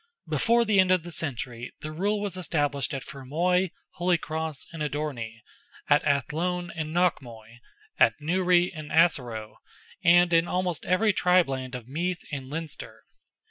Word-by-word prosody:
Before 235 +1 +3
the 210 -3 +3
end 185 -1 +5
of 185 -3 +3
the 175 - -8
century, 125 -6 -4
the 155 - -5
rule 200 +6 0
was 205 -2 -3
established 145 -6 -1
at 135 -2 -4
Fermoy, 175 +7 0 0.3
Holycross, 160 -4 -1
and 165 - -7
Odorney; 140 -7 -4 0.5
at 145 - +5
Athlone 170 +5 0
and 155 -1 -4
Knockmoy; 120 -10 -1 0.4
at - - +4
Newry 180 +3 +2
and 155 -2 -8
Assaroe, 120 -10 +1 0.5
and 175 0 +5
in 165 +1 +4
almost 180 -3 -2
every 200 +4 +3
tribe 180 -2 +4
land 130 -1 -4
of 120 -2 -8
Meath 175 +6 -2
and 135 -3 -5
Leinster. 160 0 -7
160 Hz, 145 wpm, -27 LUFS, 140-180 Hz, 0.5 s, end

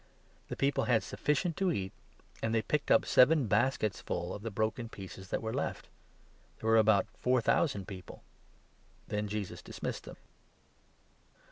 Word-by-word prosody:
The - - -4
people 140 +1 +1
had 120 -3 +3
sufficient 155 +4 0
8 - - -31
to 190 -2 +2
eat, 95 - -2 0.5
and 115 0 0
they 110 - +2
picked 150 -1 -1
up - - +5
seven 140 +2 +5
baskets 110 -1 +1
full 85 +1 -3
of 105 - -6
the 115 - -3
broken 110 +2 -2
pieces 95 -2 -9
that - - -2
were 110 0 -2
left. - - -3 0.7
There 110 - -5
were 115 - +6
about 110 -2 +5
four 125 0 +2
thousand 115 - +1
people. 95 -3 -9 0.9
9 105 - -2
Then 105 0 -1
Jesus 105 -2 -4
dismissed - - -5
them. - - -10
110 Hz, 165 wpm, -32 LUFS, 100-130 Hz, 0.9 s, were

